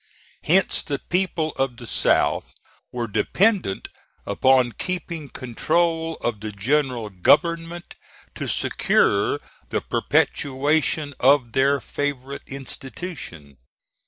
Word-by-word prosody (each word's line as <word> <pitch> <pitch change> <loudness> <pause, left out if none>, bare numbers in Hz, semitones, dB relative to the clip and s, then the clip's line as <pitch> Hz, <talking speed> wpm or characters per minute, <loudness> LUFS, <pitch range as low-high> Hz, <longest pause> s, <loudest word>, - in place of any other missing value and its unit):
Hence 190 +4 +3
the 145 -3 -3
people 175 -1 -1
of 135 -3 -1
the 120 - -9
South - - +1 0.4
were 120 -1 -3
dependent 180 - +1 0.4
upon 130 +4 +3
keeping 170 -2 -4
control 165 +7 0
of 115 -3 -1
the 110 0 -5
general 120 +1 0
government 165 - +1 0.4
to - - -5
secure - - +2 0.3
the - - -1
perpetuation 145 +1 +1
of 130 -2 +4
their 140 +3 +3
favorite 140 -1 -4
institution. 135 - -8
140 Hz, 100 wpm, -23 LUFS, 120-165 Hz, 0.4 s, of